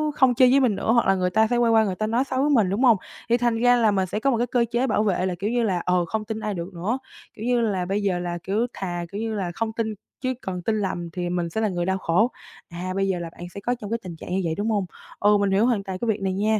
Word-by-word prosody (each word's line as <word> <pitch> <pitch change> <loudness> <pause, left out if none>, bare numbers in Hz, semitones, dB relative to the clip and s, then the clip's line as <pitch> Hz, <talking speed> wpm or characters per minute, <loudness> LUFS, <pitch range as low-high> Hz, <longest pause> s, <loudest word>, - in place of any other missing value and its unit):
không 255 -2 +4
chơi 250 +1 +5
với 275 - +5
mình 240 -7 +2
nữa 220 - 0
hoặc 235 -4 +3
là 195 - +4
người 180 -1 0
ta 220 +3 +3
sẽ 240 +1 0
quay 235 -1 +3
qua 220 -1 +5
người 190 -3 -1
ta 215 +2 -2
nói 235 +4 +1
xấu 260 -1 -1
với 295 - +2
mình, 220 -10 +4
đúng 210 +7 0
hông? 235 -5 +6 0.3
Thì 235 - +4
thành 240 -2 +1
ra 245 +1 +5
là 225 -3 +3
mình 190 -2 +1
sẽ 210 - -3
có 275 +4 +1
một 235 - +1
cái 240 +1 0
cơ 240 -1 +2
chế 245 +3 +1
bảo 215 -1 +2
vệ 185 -3 +1
là, 180 -1 -1
kiểu 205 +2 -1
như 240 0 +1
là, 185 -5 +1
ờ, 180 -1 +2
không 215 +4 -3
tin 220 0 -4
ai 210 -1 -3
được 175 +2 -6
nữa, 200 +9 -1 0.4
kiểu 220 - -7
như 245 -1 +2
là, 195 -5 0
bây 200 +3 -1
giờ 185 -3 +1
là, 175 -1 -3
kiểu, 215 +5 0
thà, 175 -2 -4
kiểu 205 +2 -4
như 225 -1 -2
là, 185 -4 -2
không 225 -1 -2
tin 220 -1 -2 0.3
chứ 255 0 0
còn 180 -2 -4
tin 220 +4 0
lầm 175 -3 -3
thì 175 +1 -4
mình 175 -1 -1
sẽ 220 - -2
là 215 - +2
người 175 -1 -2
đau 190 0 0
khổ, 195 +8 +2 0.4
à, 180 +2 -5
bây 195 0 +1
giờ 185 -2 0
là 170 -1 -5
bạn 175 +1 -10
sẽ 200 - -6
có 245 +4 -1
trong 205 - -6
cái 230 - 0
tình 175 -3 -7
trạng - - -10
như 190 +1 +1
vậy, 165 - -1
đúng 215 +2 -1
hông? 205 -3 +1 0.3
Ừ, 205 0 +5
mình 200 -1 +1
hiểu 205 +4 +3
hoàn 225 -5 +1
toàn 190 -1 -5
cái 235 - -2
việc 215 -2 0
này 190 -1 0
nha, 215 +2 +1
210 Hz, 330 wpm, -24 LUFS, 185-230 Hz, 0.4 s, hông